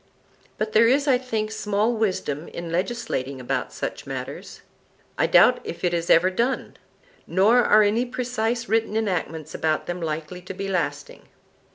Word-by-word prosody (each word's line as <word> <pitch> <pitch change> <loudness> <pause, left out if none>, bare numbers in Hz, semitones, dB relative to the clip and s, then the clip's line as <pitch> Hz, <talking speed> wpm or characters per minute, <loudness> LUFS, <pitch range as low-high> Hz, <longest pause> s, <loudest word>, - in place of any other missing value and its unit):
But 215 0 -2
there 230 +1 +6
is, 280 +4 +2
I 255 -3 +4
think, 220 -4 -3
small 210 +1 0
wisdom 185 -8 -2
in 170 -1 -7
legislating 170 - -2
about 125 - -2
such - - -5
matters,—I - - -6
doubt - - +6
if - - -7
it 175 -1 +1
is 170 0 -2
ever 180 +3 +5
done; 235 +7 -1 0.5
nor 215 +8 +4
are 215 0 +5
any 220 +4 +2
precise 240 -1 -2
written 225 -1 +1
enactments 165 -7 -2
about 155 -1 -1
them 175 0 -4
likely 160 +2 -4
to 185 +1 -8
be 195 +1 -4
lasting. 145 -7 -3
200 Hz, 155 wpm, -24 LUFS, 170-230 Hz, 0.5 s, there